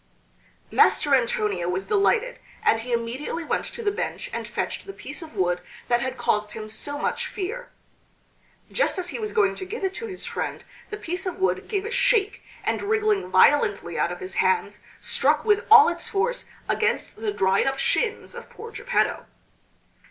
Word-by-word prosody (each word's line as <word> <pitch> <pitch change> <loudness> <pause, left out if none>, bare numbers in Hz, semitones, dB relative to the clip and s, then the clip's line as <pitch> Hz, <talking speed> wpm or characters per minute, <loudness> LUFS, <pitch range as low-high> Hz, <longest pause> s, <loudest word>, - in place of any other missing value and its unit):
Master 290 - +4
Antonio 210 -8 +1
was 185 +2 -2
delighted, 450 +4 +2 0.2
and 225 - +4
he 245 +2 -6
immediately 240 +8 -2
went - - -1
to 470 - -6
the 410 - +2
bench - - -4
and - - -4
fetched - - -3
the 390 - -6
piece 295 0 -6
of 315 -8 -10
wood 180 -2 +1 0.3
that 240 0 +3
had 260 +1 -3
caused 210 0 0
him 215 -1 -6
so 285 +7 -4
much - - -1
fear. 475 +6 -5 1.0
Just - - +1
as 360 -1 -2
he - - -5
was 425 -1 -3
going 420 -4 +3
to - - -6
give 395 +3 -6
it 380 0 0
to 460 - -5
his 375 -3 -5
friend - - -4 0.3
the 420 - -5
piece 365 0 -4
of 360 -1 -3
wood 380 0 0
gave 400 -2 -1
a 445 - -4
shake 455 -5 +2 0.2
and - - 0
wriggling 425 -1 +1
violently 435 -3 +3
out - - +1
of - - -7
his 375 0 -6
hands 460 -1 +1 0.2
struck - - +2
with 420 +1 +2
all 440 0 +10
its 345 -4 -2
force 475 +5 -1 0.2
against - - 0
the 430 - -2
dried 195 - +2
up 270 0 0
shins 440 +11 0
of 475 -1 -10
poor 460 +1 -10
Geppetto. - - 0
385 Hz, 185 wpm, -25 LUFS, -, 1.0 s, all